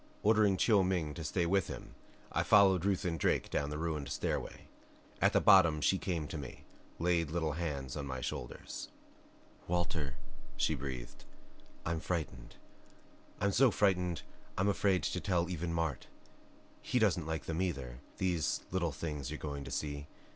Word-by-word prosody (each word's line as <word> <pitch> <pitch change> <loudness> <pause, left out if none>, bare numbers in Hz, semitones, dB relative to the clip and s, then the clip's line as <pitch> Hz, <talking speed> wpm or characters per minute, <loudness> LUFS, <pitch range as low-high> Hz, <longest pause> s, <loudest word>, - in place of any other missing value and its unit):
Ordering 105 -2 +4
Chiu 105 -3 +4
Ming 90 -5 0
to 85 - -6
stay 85 +3 0
with 95 0 +2
him - - -8 0.4
I - - +1
followed 95 -3 +5
Ruth 100 -1 +1
and 85 -3 -1
Drake - - +1
down 70 - 0
the 75 - -4
ruined 75 -3 -2
stairway. - - -3 0.5
At - - +5
the - - +4
bottom 90 -7 +6
she 90 +7 +2
came 85 -5 -2
to 80 - -4
me, 70 -3 -8 0.3
laid 85 -2 +1
little 80 -1 0
hands 70 -5 -3
on 70 -2 -4
my 65 -1 -3
shoulders. - - -5 0.8
"Walter," 85 -5 -1 0.4
she - - +2
breathed, 65 -4 -6 0.6
"I'm 80 0 -1
frightened. 80 -8 -4 0.8
I'm 100 +1 +2
so 130 +6 +5
frightened 90 -5 +1 0.3
I'm 100 +2 +2
afraid 100 -2 +2
to 90 - -1
tell 90 -3 +1
even 85 -1 -2
Mart. 80 -5 -2 0.7
He - - -1
doesn't 95 -8 +2
like 80 -3 -3
them, 80 +2 -2
either, 70 -9 -3 0.2
these 85 -6 0
little 85 -3 0
things 75 -2 -4
you're 75 - -4
going 70 -2 -5
to - - -7
see. 70 -1 -3
85 Hz, 160 wpm, -33 LUFS, 75-95 Hz, 0.8 s, bottom